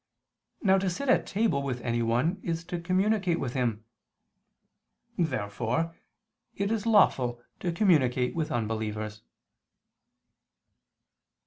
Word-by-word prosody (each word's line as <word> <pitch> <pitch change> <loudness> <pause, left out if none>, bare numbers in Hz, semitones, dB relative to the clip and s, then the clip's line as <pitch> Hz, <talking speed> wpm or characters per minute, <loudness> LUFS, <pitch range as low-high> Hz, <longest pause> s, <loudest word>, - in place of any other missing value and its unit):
Now 190 -2 +5
to 190 0 0
sit 230 +11 -3
at - - +3
table 200 -9 +1
with 130 -3 -3
anyone 120 +8 0
is 165 -1 -3
to 175 0 -4
communicate 185 0 +1
with 125 -3 -3
him. 115 -5 -1 1.3
Therefore 125 +3 -1 0.6
it 200 +1 -1
is 225 0 -1
lawful 130 - +4 0.2
to 175 - -1
communicate 145 - +2
with 160 -2 -2
unbelievers. 110 -1 -3
160 Hz, 105 wpm, -28 LUFS, 120-185 Hz, 1.3 s, Now